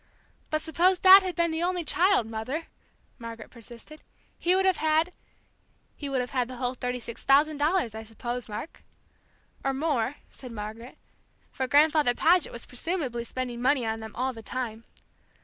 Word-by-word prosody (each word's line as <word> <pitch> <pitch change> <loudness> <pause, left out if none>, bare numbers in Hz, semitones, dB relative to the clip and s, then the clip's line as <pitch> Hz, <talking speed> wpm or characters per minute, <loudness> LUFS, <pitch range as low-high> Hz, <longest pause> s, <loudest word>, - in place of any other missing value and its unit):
"But 310 0 -1
suppose 350 +4 +3
Dad 380 +2 +9
had 370 -2 -4
been 340 -1 +1
the 320 +1 -2
only 355 0 0
child, 365 - +3
Mother," 225 +9 -4 0.5
Margaret 230 -1 -9
persisted, 240 +6 -12 0.4
"he 355 +2 +3
would 380 0 +2
have 375 -2 +3
had 315 +3 +1 0.4
" - - -41
"He 285 - -6
would 265 -2 0
have 250 - -5
had 250 -3 0
the 255 - -8
whole 250 0 -2
thirty 250 0 -3
six 235 -1 -8
thousand 290 +2 +4
dollars, 300 - +1
I 220 - -6
suppose, 240 +2 -5
Mark." 210 +9 -7 0.8
"Or 270 0 0
more," 280 -3 0 0.2
said 255 -2 -11
Margaret, 225 +3 -8 0.5
"for 260 -2 -2
Grandfather 295 -2 +4
Paget 350 +4 +3
was 235 - -6
presumably 255 -3 -3
spending 245 -1 -4
money 260 -1 +2
on 225 0 -2
them 220 -1 -9
all 260 +1 -1
the 225 - -10
time." 230 -1 -5
260 Hz, 175 wpm, -27 LUFS, 235-320 Hz, 0.8 s, Dad